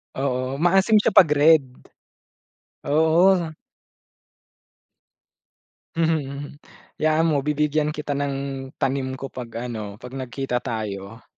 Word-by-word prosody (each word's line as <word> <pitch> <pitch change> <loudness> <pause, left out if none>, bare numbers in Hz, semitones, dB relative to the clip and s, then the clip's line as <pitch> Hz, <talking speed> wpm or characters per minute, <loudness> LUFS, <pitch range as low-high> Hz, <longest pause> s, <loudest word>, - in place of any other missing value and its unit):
Oo, 130 0 -2
maasim 195 +4 +4
siya 210 - +4
'pag 175 - +7
red. 150 0 +5 1.2
Oo. 165 +4 +3 2.5
Mhm, 165 -1 +2
mhm. 140 +1 -7 0.5
'Yaan 155 +1 +2
mo 145 - +2
bibigyan 150 +1 0
kita 150 -1 -4
ng 140 -1 -1 0.4
tanim 130 -1 -2
ko 135 0 -7
'pag 125 -2 -7 0.2
ano, 105 -3 -6
'pag 125 +3 -11
nagkita 130 -1 -3
tayo. 110 -2 -6
140 Hz, 105 wpm, -23 LUFS, 130-155 Hz, 2.5 s, pag